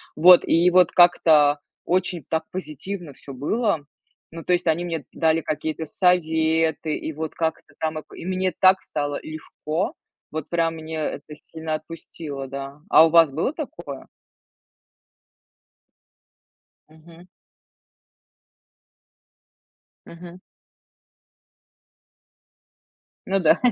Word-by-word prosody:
Вот, 175 +3 +8
и 170 +2 +4
вот 180 -1 +4
как-то 155 -4 +5 0.3
очень 180 -2 -1
так 160 0 0
позитивно 175 -1 -6
всё 140 - -11
было. 200 - 0 0.5
Ну, 165 0 -9
то - - -2
есть, 175 0 +1
они 165 +2 +1
мне 165 -5 -4
дали 160 0 +2
какие-то 155 0 -4
советы, 160 -2 +1
и 160 - -5
вот 155 +1 -5
как-то 160 -2 -3
там 155 0 -2
и - - -9
п - - -16
и - - -8
мне 185 0 -1
так 190 0 +5
стало 145 -1 -3
легко. 155 +2 -4 0.4
Вот 155 -1 -5
прям 165 -1 0
мне 160 0 -7
это 150 -1 -5
сильно 160 +1 -5
отпустило, 155 -3 -8
да. 140 +2 -7
А 160 - +8
у - - +2
вас 165 -2 +5
было 160 - -1
такое? 175 - -8 2.8
Мгм. 165 +2 -17 2.8
Мгм. 175 +1 -12 2.9
Ну 195 +1 +1
да. 160 - +4
160 Hz, 110 wpm, -23 LUFS, 155-175 Hz, 2.9 s, Вот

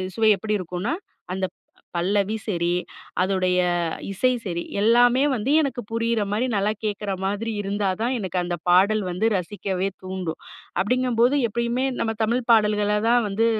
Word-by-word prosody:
சுவை 220 -1 +4
எப்டி 210 +1 -1
இருக்குன்னா? 180 - -3 0.4
அந்த 190 0 -1 0.5
பல்லவி 200 +4 +1
சரி, 175 -4 0 0.5
அதோடைய 185 -1 +1 0.5
இசை 200 +6 +2
சரி, 170 -3 -3 0.2
எல்லாமே 240 +4 +5
வந்து 250 +2 -1
எனக்கு 275 -4 -2
புரியிற 230 0 0
மாரி 215 +5 +1
நல்லா 200 +1 +1
கேட்குற 205 -1 -2
மாதிரி 205 +4 -1
இருந்தா 200 0 -1
தான் 240 +3 +1
எனக்கு 185 -3 -3
அந்த 175 0 -2
பாடல் 200 +5 +5
வந்து 180 +5 -1
ரசிக்கவே 190 0 -2 0.2
தூண்டும். 185 -3 -4 0.4
அப்டிங்கம்போது 250 +3 +2
எப்பயுமே 235 +3 -1
நம்ம 225 - 0
தமிழ் 235 +3 +1
பாடல்கள 210 -2 +3
தான் 240 0 +4
வந்து 205 +3 +1
210 Hz, 140 wpm, -24 LUFS, 190-230 Hz, 0.5 s, எல்லாமே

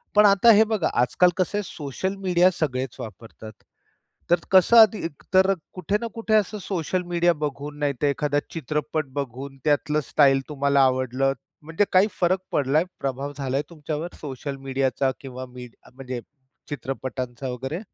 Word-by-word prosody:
पण 210 0 +7
आता 200 +3 +6
हे 215 +1 +6
बघा, 215 -7 0
आजकाल 125 +9 +4
कसं 190 +3 0
आहे, 205 - -1
सोशल 175 +3 -4
मीडिया 180 -2 +3
सगळेच 130 -4 -2
वापरतात. 110 -1 -9 0.8
तर 175 0 +4
कसं, 190 +5 +6
आधी 220 -2 +7
एकतर 185 +5 +2 0.2
कुठे 185 +3 -1
ना 235 - -2
कुठे 225 -1 -2
असं 210 0 +1
सोशल 180 -1 -2
मीडिया 175 0 +3
बघून, 145 -1 -5
नाहीतर 145 -1 0
एखादा 145 0 +1
चित्रपट 155 0 -2
बघून, 135 0 -5
त्यातलं 150 0 +1
स्टाईल 135 -2 +4
तुम्हाला 140 -1 +2
आवडलं, 130 +1 +1 0.3
म्हणजे 165 +6 0
काही 190 +2 +6
फरक 185 +1 +2
पडलाय, 145 +3 +2 0.2
प्रभाव 135 +1 -3
झालाय 135 0 -1
तुमच्यावर 155 +1 -5
सोशल 140 -1 -5
मीडियाचा? 135 0 0
किंवा 130 -1 -7
मीड 125 -2 -10 0.2
म्हणजे 130 -2 -6 0.5
चित्रपटांचा 130 -2 -5
वगैरे? 135 +6 -4
145 Hz, 145 wpm, -24 LUFS, 135-180 Hz, 0.8 s, पण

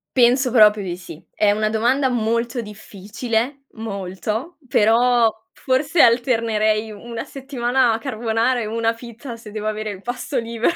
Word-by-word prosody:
Penso 250 +1 +4
proprio 215 -3 +6
di 175 -2 -4
sì. 170 -3 -11
È 210 -1 +3
una 215 +1 0
domanda 250 +5 +1
molto 235 +1 -1
difficile, 220 +5 -4
molto, 215 - -5
però 235 +1 +4 0.2
forse 285 +5 +1
alternerei 225 -3 +2
1 230 +2 -7
settimana 260 -2 0
a 220 - 0
carbonara 235 0 0
e - - -3
1 225 +1 0
fit, 235 +2 -13
a 240 -4 -5
se 220 -2 -12
devo 215 0 -4
avere 215 0 -3
il 190 -2 -9
pasto 250 +4 -4
libero 230 +7 0
230 Hz, 150 wpm, -21 LUFS, 215-250 Hz, 0.2 s, proprio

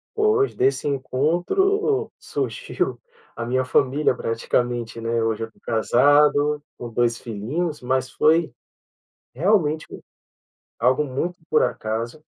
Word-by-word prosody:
pois, 430 -1 +2
desse 135 +2 +1
encontro 175 - +1
surgiu - - -3 0.4
a 115 - -4
minha 130 +2 +1
família 135 +1 +2
praticamente, 115 0 -2
né? 115 0 0
Hoje 115 0 -1
eu - - -4
estou 110 - -27
casado 145 +5 +3 0.2
com 120 - -7
2 115 0 +1
filhinhos, 145 +9 -3
mas 130 +1 0
foi, 160 +5 +3 0.8
realmente, 160 - +1 0.9
algo 130 +5 +2
muito 155 +7 -3
por - - +4
acaso. 115 +6 -3
135 Hz, 110 wpm, -23 LUFS, 120-160 Hz, 0.9 s, por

